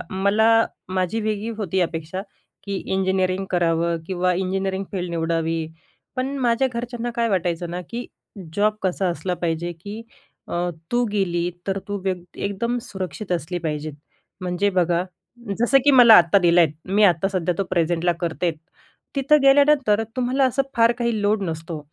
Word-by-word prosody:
मला 200 Hz, +4 st, +3 dB, 0.5 s
माझी 185 Hz, +5 st, 0 dB
वेगळी 215 Hz, +1 st, -2 dB
होती 190 Hz, -2 st, -1 dB
अपेक्षा 165 Hz, +2 st, -3 dB, 0.4 s
की, 200 Hz, -1 st, -4 dB
इंजिनिअरिंग 190 Hz, 0 st, 0 dB
करावं 170 Hz, -1 st, +1 dB
किंवा 180 Hz, -1 st, 0 dB
इंजिनियरिंग 190 Hz, +1 st, -2 dB
फील्ड 180 Hz, -2 st, -3 dB
निवडावी. 165 Hz, -1 st, -1 dB, 0.5 s
पण 265 Hz, +2 st, -2 dB
माझ्या 250 Hz, +1 st, +2 dB
घरच्यांना 240 Hz, 0 st, -4 dB
काय 235 Hz, -1 st, +1 dB
वाटायचंना, 175 Hz, -2 st, -1 dB
की 240 Hz, +1 st, -5 dB, 0.5 s
जॉब 210 Hz, +1 st, +2 dB
कसा 190 Hz, 0 st, 0 dB
असला 175 Hz, +2 st, -2 dB
पाहिजे, 170 Hz, +1 st, -1 dB
की 210 Hz, +4 st, -7 dB, 0.5 s
अ, -, -, -7 dB, 0.4 s
तू 245 Hz, 0 st, +3 dB
गेली 175 Hz, -4 st, 0 dB, 0.2 s
तर 195 Hz, 0 st, -1 dB
तू 205 Hz, -, -2 dB
वेग 185 Hz, -2 st, -1 dB
एकदम 235 Hz, +5 st, -2 dB
सुरक्षित 190 Hz, 0 st, -5 dB
असली 175 Hz, +1 st, -2 dB
पाहिजेत. 150 Hz, 0 st, -3 dB, 0.5 s
म्हणजे 185 Hz, +3 st, 0 dB
बघा 175 Hz, 0 st, +2 dB, 0.6 s
जसं, 240 Hz, +4 st, +4 dB
की 290 Hz, -, +6 dB
मला 245 Hz, -4 st, +8 dB
आत्ता 170 Hz, +3 st, +4 dB
दिल 175 Hz, -1 st, +4 dB
आहेत. 165 Hz, -4 st, +5 dB, 0.2 s
मी 200 Hz, +3 st, +2 dB
आता 180 Hz, 0 st, +3 dB
सध्या 180 Hz, -2 st, 0 dB
तो 195 Hz, -, +1 dB
प्रेझेंटला 175 Hz, 0 st, +1 dB
करते. 170 Hz, +1 st, -1 dB, 0.7 s
तिथं 290 Hz, +2 st, +4 dB
गेल्यानंतर 275 Hz, -6 st, +4 dB
तुम्हाला 255 Hz, +2 st, +1 dB
असं 260 Hz, +1 st, +2 dB
फार 230 Hz, +1 st, +5 dB
काही 235 Hz, -3 st, 0 dB
लोड 205 Hz, 0 st, +2 dB
नसतो. 165 Hz, -1 st, -4 dB
190 Hz, 150 wpm, -22 LUFS, 175-225 Hz, 0.7 s, मला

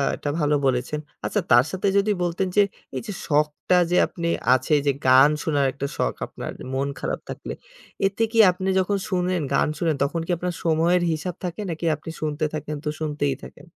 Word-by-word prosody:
এটা 145 Hz, -, -4 dB
ভালো 150 Hz, 0 st, +2 dB
বলেছেন। 130 Hz, +3 st, 0 dB, 0.3 s
আচ্ছা 205 Hz, -, 0 dB
তার 120 Hz, +1 st, +7 dB
সাথে 190 Hz, +1 st, -1 dB
যদি 200 Hz, +2 st, +3 dB
বলতেন 175 Hz, +2 st, 0 dB
যে -, -, +8 dB, 0.3 s
এই -, -, -2 dB
যে 205 Hz, -, -4 dB
শখটা 150 Hz, +4 st, +1 dB, 0.2 s
যে -, -, +3 dB
আপনি 170 Hz, -1 st, -4 dB, 0.3 s
আছে। 130 Hz, +4 st, 0 dB
এইযে 140 Hz, 0 st, +1 dB, 0.2 s
গান 130 Hz, +2 st, +7 dB
শোনার 145 Hz, -3 st, +1 dB
একটা 140 Hz, +1 st, -4 dB
শখ -, -, 0 dB
আপনার -, -, -7 dB, 0.2 s
মন 135 Hz, +1 st, 0 dB
খারাপ -, -, -2 dB
থাকলে, -, -, -6 dB, 0.5 s
এতে 205 Hz, +3 st, -1 dB
কি 230 Hz, -, -2 dB
আপনি 185 Hz, +1 st, -5 dB
যখন 200 Hz, +2 st, +1 dB
শুনেন, 180 Hz, -2 st, 0 dB
গান -, -, +3 dB
শুনেন, 165 Hz, -3 st, +1 dB
তখন 165 Hz, +4 st, -1 dB
কি 180 Hz, -, -3 dB
আপনার 180 Hz, 0 st, -3 dB
সময়ের 170 Hz, +2 st, +3 dB
হিসাব 165 Hz, +3 st, -3 dB
থাকে 180 Hz, +3 st, -4 dB
নাকি 165 Hz, +1 st, -4 dB
আপনি 155 Hz, +2 st, -10 dB
শুনতে 155 Hz, 0 st, -1 dB
থাকেন 150 Hz, 0 st, -4 dB
তো -, -, 0 dB
শুনতেই 145 Hz, -3 st, -1 dB
থাকেন? -, -, -12 dB
160 Hz, 190 wpm, -24 LUFS, 145-180 Hz, 0.5 s, যে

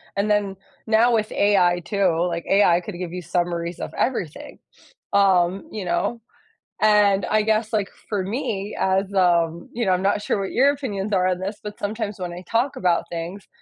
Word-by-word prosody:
And 200 Hz, +2 st, 0 dB
then, 205 Hz, -2 st, +1 dB, 0.3 s
now, 225 Hz, +2 st, +4 dB
with 215 Hz, -1 st, -1 dB
AI 185 Hz, -4 st, +3 dB
too, 185 Hz, -5 st, +1 dB
like, 170 Hz, -1 st, -4 dB
AI 180 Hz, -3 st, +4 dB
could 185 Hz, +2 st, -7 dB
give 180 Hz, -2 st, -4 dB
you 180 Hz, 0 st, -6 dB
summaries 170 Hz, 0 st, -2 dB
of -, -, -5 dB
everything, 190 Hz, -, -3 dB, 0.5 s
um, 190 Hz, -2 st, +3 dB
you 210 Hz, -3 st, -5 dB
know? 230 Hz, +6 st, -1 dB, 0.6 s
And 205 Hz, -3 st, +4 dB
I 215 Hz, 0 st, +2 dB
guess, 220 Hz, +1 st, +1 dB
like, 210 Hz, -3 st, -1 dB, 0.2 s
for 205 Hz, -3 st, -1 dB
me 205 Hz, -1 st, -3 dB
as, 190 Hz, +1 st, +1 dB
um, 170 Hz, -3 st, +2 dB
you 235 Hz, 0 st, -2 dB
know 190 Hz, -, +2 dB
I'm 180 Hz, 0 st, +1 dB
not 200 Hz, +1 st, +1 dB
sure -, -, 0 dB
what 195 Hz, -, -3 dB
your 275 Hz, +3 st, +4 dB
opinions 215 Hz, -8 st, -4 dB
are 185 Hz, -1 st, +3 dB
on 185 Hz, -1 st, 0 dB
this, 195 Hz, +3 st, -4 dB
but 210 Hz, 0 st, -7 dB
sometimes 210 Hz, 0 st, -3 dB
when 175 Hz, -1 st, -4 dB
I 175 Hz, +1 st, -8 dB
talk 245 Hz, +4 st, +1 dB
about 175 Hz, -2 st, +2 dB
things, 170 Hz, +4 st, -6 dB
195 Hz, 190 wpm, -23 LUFS, 180-210 Hz, 0.6 s, now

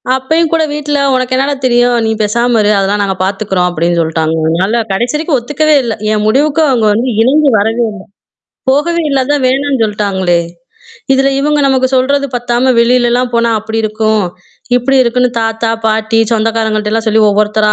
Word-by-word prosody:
அப்பயும் 315 Hz, +5 st, 0 dB
கூட 325 Hz, -1 st, +2 dB
வீட்ல 295 Hz, 0 st, -2 dB, 0.2 s
"உனக்கு 255 Hz, 0 st, -1 dB
என்னடா 275 Hz, +2 st, 0 dB
தெரியும்? 245 Hz, 0 st, +2 dB
நீ -, -, 0 dB
பேசாம 235 Hz, +3 st, +1 dB
இரு" 210 Hz, 0 st, +2 dB
அதெல்லாம் 200 Hz, +1 st, 0 dB
நாங்க 190 Hz, -1 st, -2 dB
பார்த்துக்குறோம் 190 Hz, -2 st, -1 dB
அப்படின்னு 170 Hz, 0 st, -1 dB
சொல்ட்டாங்க 160 Hz, 0 st, -1 dB
அதுனால 190 Hz, +8 st, 0 dB
கடைசி 240 Hz, +8 st, -1 dB
வரைக்கும் 305 Hz, -2 st, 0 dB
ஒத்துக்கவே 300 Hz, +5 st, 0 dB
இல்ல. 230 Hz, -2 st, -2 dB, 0.2 s
என் 210 Hz, -1 st, 0 dB
முடிவுக்கு 290 Hz, +7 st, +1 dB
அவங்க 235 Hz, -5 st, +1 dB
வந்து 235 Hz, +4 st, -1 dB
இணங்கி 285 Hz, +4 st, +3 dB
வரவே 225 Hz, +3 st, 0 dB
இல்ல. -, -, -8 dB, 0.8 s
போகவே 340 Hz, +5 st, 0 dB
இல்லா 275 Hz, -2 st, +1 dB
அதான் 290 Hz, 0 st, -1 dB
வேணான்னு 270 Hz, -1 st, 0 dB
சொல்டாங்களே! 195 Hz, -4 st, -1 dB, 0.8 s
இதுல 270 Hz, +1 st, +2 dB
இவங்க 295 Hz, +1 st, 0 dB
நமக்கு 260 Hz, -1 st, +1 dB
சொல்றது 280 Hz, +2 st, +1 dB
பத்தாம 245 Hz, +2 st, 0 dB
வெளிலலாம் 245 Hz, +1 st, +2 dB
போனா, 235 Hz, 0 st, +1 dB
அப்படி 220 Hz, +1 st, -4 dB
இருக்கும் 215 Hz, -1 st, 0 dB, 0.5 s
இப்படி 270 Hz, +2 st, +1 dB
இருக்குன்னு 250 Hz, +1 st, 0 dB
தாத்தா, 225 Hz, 0 st, -1 dB, 0.2 s
பாட்டி, 220 Hz, +1 st, 0 dB
சொந்தக்காரங்கள்ட்டல்லாம் 220 Hz, 0 st, -1 dB
சொல்லி 220 Hz, 0 st, +2 dB
ஒவ்வொருத்தரா 210 Hz, +1 st, +1 dB
235 Hz, 160 wpm, -12 LUFS, 215-265 Hz, 0.8 s, இணங்கி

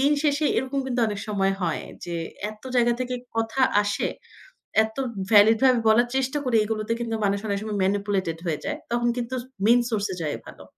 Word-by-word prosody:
দিন 280 Hz, +2 st, +4 dB
শেষে 295 Hz, 0 st, +2 dB
এরকম 265 Hz, +1 st, -2 dB
কিন্তু 250 Hz, -1 st, -1 dB
অনেক 205 Hz, -1 st, -4 dB
সময় 195 Hz, -2 st, +1 dB
হয় 165 Hz, -3 st, -1 dB, 0.2 s
যে 170 Hz, -, -3 dB, 0.3 s
এত 215 Hz, 0 st, -15 dB
জায়গা 240 Hz, -1 st, +4 dB
থেকে 255 Hz, 0 st, -2 dB, 0.2 s
কথা 225 Hz, +4 st, -1 dB, 0.2 s
আসে। 205 Hz, -, -1 dB, 0.8 s
এত 220 Hz, +2 st, -11 dB, 0.3 s
ভ্যালিড 215 Hz, +2 st, +7 dB
ভাবে 255 Hz, -3 st, +5 dB
বলার 235 Hz, +3 st, +5 dB
চেষ্টা 265 Hz, +2 st, 0 dB
করে, 245 Hz, -3 st, +3 dB
এগুলোতে 215 Hz, +1 st, -2 dB
কিন্তু 230 Hz, -1 st, -2 dB
মানুষ 200 Hz, 0 st, +1 dB
অনেক 200 Hz, -1 st, 0 dB
সময় 215 Hz, -1 st, -3 dB
ম্যানিপুলেটেড 195 Hz, -3 st, 0 dB
হয়ে 160 Hz, -3 st, -1 dB
যায়। 295 Hz, +1 st, -2 dB
তখন 240 Hz, 0 st, +1 dB
কিন্তু 245 Hz, +1 st, -3 dB
স -, -, -13 dB, 0.2 s
মেইন 235 Hz, +3 st, +6 dB
সোর্স 210 Hz, -3 st, 0 dB
এ -, -, -5 dB
যাওয়াই 150 Hz, -2 st, -2 dB
ভালো। -, -, -11 dB
225 Hz, 195 wpm, -25 LUFS, 205-250 Hz, 0.8 s, ভ্যালিড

